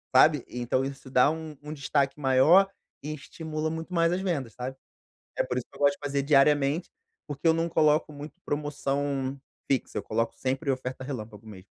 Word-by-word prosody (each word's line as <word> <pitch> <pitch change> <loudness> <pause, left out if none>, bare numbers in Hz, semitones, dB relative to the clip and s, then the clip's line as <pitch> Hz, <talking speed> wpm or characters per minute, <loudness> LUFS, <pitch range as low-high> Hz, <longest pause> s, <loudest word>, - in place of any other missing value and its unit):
sabe. - - +6
Então 125 +1 -1
isso 135 -1 -7
dá 130 +3 +5
um 160 -2 -7
um 150 - -7
destaque 140 -1 0
maior 150 +8 +5 0.3
e 150 +2 -4
estimula 155 +1 -4
muito 165 +3 -6
mais 165 -1 +3
as 180 +2 0
vendas, 140 - -2
sabe. 130 +2 -5 0.6
É - - +3
por 125 -1 -3
isso 125 - -3
que - - -18
eu - - -18
gosto 145 0 +4
de - - -15
fazer 140 -1 0
diariamente, 145 +3 +3 0.4
porque 145 +2 -2
eu 160 - +6
não 165 +1 0
coloco 155 -1 +3
muito 145 +1 -9
promoção 140 -2 -2 0.3
fixa, 135 - 0
eu - - -7
coloco 115 +1 -1
sempre 135 +2 -1
oferta 130 0 -4
relâmpago 110 -6 -7
mesmo. 95 -3 -11
140 Hz, 190 wpm, -27 LUFS, 130-155 Hz, 0.6 s, sabe